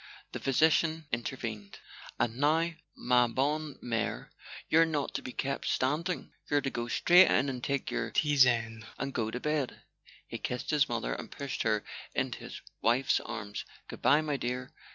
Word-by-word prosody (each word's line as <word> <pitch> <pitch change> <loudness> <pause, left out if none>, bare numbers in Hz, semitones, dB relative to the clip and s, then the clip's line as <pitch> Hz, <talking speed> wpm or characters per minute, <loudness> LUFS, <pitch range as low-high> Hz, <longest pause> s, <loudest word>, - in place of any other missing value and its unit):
The - - -5
physician 160 +3 +2
intervened. 115 -4 -4 0.4
"And, 115 0 0
now, 160 +4 +2 0.3
ma 125 -1 +3
bonne 145 +4 -1
Trier 115 -2 -2
e, - - -34 0.3
you're 165 +1 +6
not 150 -3 -2
to - - -2
be 125 - -7
kept 135 +2 -3
standing. 150 +4 -1 0.2
You're 145 -1 +3
to 135 - -2
go 120 0 -3
straight 175 +9 +6
in 135 +1 +3
and 125 -2 -5
take 140 -1 -1
your - - -1
tisane 120 -6 +3
and 135 0 -3
go 110 -3 -1
to 125 - -4
bed." 150 -2 -2 0.4
He - - -6
kissed 125 - -3
his 150 -2 +3
mother - - -1
and - - -6
pushed 140 -1 -4
her 110 -1 +1 0.3
into - - -1
his - - -8 0.2
wife's 120 +4 +3
arms. 105 -3 -6 0.2
"Good - - -9
bye, 145 +3 +5
my 150 -2 -1
dear. 125 0 -4
130 Hz, 175 wpm, -30 LUFS, 120-150 Hz, 0.4 s, you're